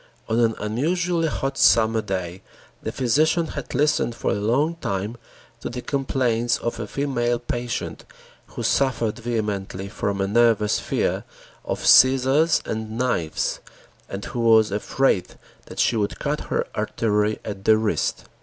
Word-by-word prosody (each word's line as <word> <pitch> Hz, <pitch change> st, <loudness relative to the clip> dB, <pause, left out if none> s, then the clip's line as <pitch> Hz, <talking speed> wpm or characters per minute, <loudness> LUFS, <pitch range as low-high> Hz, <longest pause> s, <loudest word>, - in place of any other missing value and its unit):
On 110 Hz, +1 st, +1 dB
an 115 Hz, -2 st, +2 dB
unusually 165 Hz, +10 st, 0 dB
hot 135 Hz, -2 st, -3 dB
summer 110 Hz, -1 st, +4 dB
day 95 Hz, -3 st, -4 dB, 0.4 s
the -, -, -4 dB
physician 155 Hz, +7 st, +2 dB
had 145 Hz, -, -6 dB
listened 150 Hz, -5 st, +1 dB
for -, -, -1 dB
a -, -, +1 dB
long 130 Hz, +11 st, 0 dB
time 100 Hz, -, -3 dB, 0.4 s
to -, -, -5 dB
the 125 Hz, 0 st, -6 dB
complaints 125 Hz, -4 st, 0 dB
of 120 Hz, 0 st, -4 dB
a 110 Hz, -, -4 dB
female 120 Hz, -2 st, -1 dB
patient 120 Hz, 0 st, -4 dB, 0.4 s
who -, -, -7 dB
suffered 120 Hz, -5 st, +1 dB
vehemently 105 Hz, -5 st, -3 dB
from 100 Hz, -2 st, -2 dB
a 95 Hz, -, +1 dB
nervous 110 Hz, 0 st, +3 dB
fear -, -, -1 dB, 0.4 s
of -, -, -4 dB
scissors 135 Hz, +5 st, +5 dB
and 110 Hz, 0 st, -4 dB
knives 120 Hz, -11 st, -1 dB, 0.5 s
and 95 Hz, +1 st, -6 dB
who 120 Hz, -, -5 dB
was 110 Hz, -2 st, +5 dB
afraid 105 Hz, 0 st, 0 dB, 0.3 s
that -, -, -11 dB
she -, -, +2 dB
would 105 Hz, -2 st, -1 dB
cut -, -, -2 dB
her -, -, 0 dB
artery 105 Hz, -1 st, 0 dB
at 100 Hz, -2 st, -6 dB
the 110 Hz, 0 st, +6 dB
wrist. 110 Hz, -1 st, -1 dB
115 Hz, 145 wpm, -23 LUFS, 105-130 Hz, 0.5 s, the